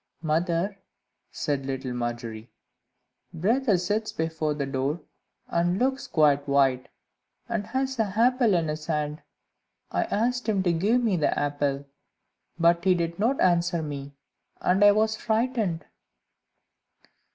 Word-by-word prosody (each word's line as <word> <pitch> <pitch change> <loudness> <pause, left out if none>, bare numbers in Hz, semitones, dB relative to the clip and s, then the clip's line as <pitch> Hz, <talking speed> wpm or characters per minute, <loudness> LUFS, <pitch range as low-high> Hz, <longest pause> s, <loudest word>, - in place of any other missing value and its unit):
"Mother," 170 +5 0 0.5
said 140 -2 -2
little 135 -2 -3
Margery, 120 -1 -5 0.8
"brother 215 +5 +2
sits 210 +5 -1
before 160 -2 -2
the 140 -1 -2
door, 135 +4 -2 0.5
and 175 +2 +1
looks 265 +4 0
quite 145 -3 +3
white, 135 -2 +2 0.6
and 225 -4 -3
has 265 -1 -2
an 205 -4 0
apple 240 -2 +3
in 165 -2 +1
his 155 0 -4
hand; 150 -1 -2 0.7
I 345 - 0
asked 245 -2 -1
him 195 -3 +1
to 175 -2 +2
give 215 +9 +2
me 210 -6 +2
the 155 - +1
apple, 145 -1 -1 0.7
but 170 0 +3
he 185 -1 +4
did 170 0 -2
not 245 +6 +1
answer 175 -1 +2
me, 140 -2 -6 0.5
and 190 +3 +2
I 205 - +9
was 220 +1 +2
frightened." 220 -6 -1
170 Hz, 130 wpm, -26 LUFS, 145-215 Hz, 0.8 s, I